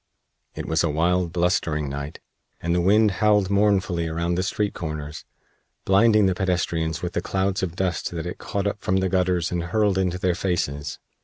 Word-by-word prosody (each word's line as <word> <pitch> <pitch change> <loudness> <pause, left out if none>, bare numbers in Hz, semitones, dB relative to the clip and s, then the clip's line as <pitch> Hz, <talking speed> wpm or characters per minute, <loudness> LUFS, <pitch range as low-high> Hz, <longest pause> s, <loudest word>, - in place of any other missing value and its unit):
It - - -5
was 80 0 +1
a 85 - +1
wild, 85 +3 +1
blustering 85 -4 0
night, 70 +2 -6 0.4
and 85 +1 -1
the 90 - +2
wind 105 +4 +4
howled 105 -2 +3
mournfully 95 -4 +2
around 85 +2 -1
the 90 - 0
street 100 +1 -1
corners, 75 -2 -6 0.6
blinding 105 +2 +5
the 95 - +3
pedestrians 85 -4 -1
with 90 - -3
the 85 - -1
clouds 95 +1 -1
of 90 -3 -3
dust 90 -3 -1
that 85 -1 -5
it 90 - -6
caught 100 -1 -3
up 100 0 -2
from 95 - +1
the 95 0 +1
gutters 90 -1 +1
and 85 -1 -2
hurled 100 +1 +1
into 90 -1 0
their 90 -1 +1
faces. 75 -6 -2
90 Hz, 185 wpm, -24 LUFS, 85-95 Hz, 0.6 s, blinding